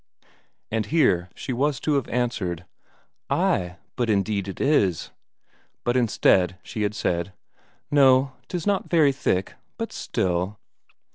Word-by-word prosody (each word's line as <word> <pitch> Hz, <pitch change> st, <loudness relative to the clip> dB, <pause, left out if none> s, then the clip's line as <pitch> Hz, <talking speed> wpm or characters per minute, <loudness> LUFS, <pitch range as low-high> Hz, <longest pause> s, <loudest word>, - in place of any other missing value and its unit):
And 110 Hz, -2 st, -1 dB
here 100 Hz, -, +2 dB
she 130 Hz, -, -4 dB
was 135 Hz, +1 st, 0 dB
to 155 Hz, -, +1 dB
have 140 Hz, -4 st, 0 dB
answered: 105 Hz, -8 st, -2 dB, 0.6 s
"Ay, 90 Hz, -1 st, +1 dB, 0.2 s
but 120 Hz, -2 st, -1 dB
indeed 100 Hz, -1 st, 0 dB
it 95 Hz, -, -7 dB
is." 105 Hz, -, +2 dB, 0.7 s
But 120 Hz, -, 0 dB
instead 95 Hz, -6 st, +3 dB
she 110 Hz, -, -5 dB
had 105 Hz, 0 st, 0 dB
said: 85 Hz, 0 st, -1 dB, 0.6 s
"No, 135 Hz, -2 st, +5 dB, 0.2 s
'tis 175 Hz, -3 st, -4 dB
not 200 Hz, -2 st, 0 dB
very 155 Hz, -5 st, +5 dB
thick, 95 Hz, -8 st, -1 dB, 0.2 s
but -, -, -4 dB
still...." 90 Hz, +3 st, -1 dB
110 Hz, 130 wpm, -24 LUFS, 95-135 Hz, 0.7 s, No